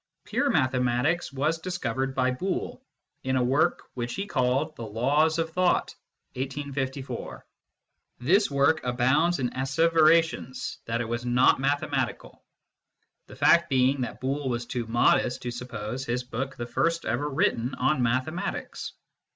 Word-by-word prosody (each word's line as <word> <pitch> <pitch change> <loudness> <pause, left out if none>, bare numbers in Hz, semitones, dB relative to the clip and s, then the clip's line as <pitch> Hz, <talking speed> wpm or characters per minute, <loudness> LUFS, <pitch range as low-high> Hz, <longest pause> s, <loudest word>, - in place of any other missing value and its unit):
Pure 285 - 0
mathematics 130 - +1
was 150 +4 0
discovered 135 -7 -3
by 130 -1 +2
Boole, 180 +9 -3 0.4
in 130 0 0
a 130 - +2
work 135 +5 +2
which 120 -1 -4
he 195 - -3
called 135 -1 0
the - - -10
Laws 140 +9 +1
of 165 -1 -1
Thought 180 +1 +1 0.4
(1854). 135 -1 -5 0.7
This 190 - +3
work 140 +3 +2
abounds 130 +8 +2
in 125 -3 -1
asseverations 160 +1 +2
that 115 +1 -1
it 115 - -3
is 120 +1 -2
not 125 +1 +4
mathematical, 140 +2 -2 0.8
the - - -12
fact 170 0 +4
being 130 +1 +2
that 125 - -4
Boole 135 +1 -2
was 120 -1 -2
too 120 -1 -4
modest 120 +1 +2
to 120 - -3
suppose 120 0 -5
his 125 0 -2
book 130 +2 -4
the 120 - -5
first 165 +8 0
ever 125 +6 -1
written 125 -2 0
on 130 +1 +1
mathematics. 130 +8 -2
130 Hz, 140 wpm, -27 LUFS, 125-155 Hz, 0.8 s, not